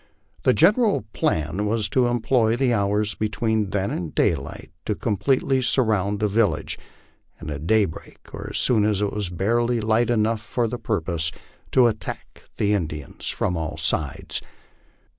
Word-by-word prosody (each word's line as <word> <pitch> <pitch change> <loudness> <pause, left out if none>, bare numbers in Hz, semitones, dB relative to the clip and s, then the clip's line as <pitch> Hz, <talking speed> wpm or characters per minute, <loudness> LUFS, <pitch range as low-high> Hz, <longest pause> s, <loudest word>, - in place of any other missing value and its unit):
The 130 - +4
general 205 - +3
plan 80 +7 0
was 110 0 +1
to 125 -2 +2
employ 120 -1 +2
the 125 -1 +2
hours 105 0 +1
between 110 -1 -1
then 100 0 -1
and 85 -3 -4
daylight - - -1 0.2
to 105 - 0
completely 130 +5 +1
surround 105 -6 +1
the 105 - +2
vil 105 +2 +3
lage, - - -5 0.6
and, 80 - -7
at 75 +2 -5
daybreak, 105 -6 0
or - - -6
as - - -2
soon 110 -4 +4
as 105 -1 +1
it 100 - -1
was 105 -4 -2
barely 115 +7 +1
light 110 +2 +2
enough 110 -1 +1
for 115 +2 -1
the 120 +2 -5
purpose, 85 -5 -1 0.4
to 130 - +6
attack 110 -2 -4
the 105 0 +2
Indians 75 -7 -3
from 90 - -1
all 80 -2 -3
sides. 75 -3 -2
105 Hz, 160 wpm, -23 LUFS, 95-120 Hz, 0.6 s, to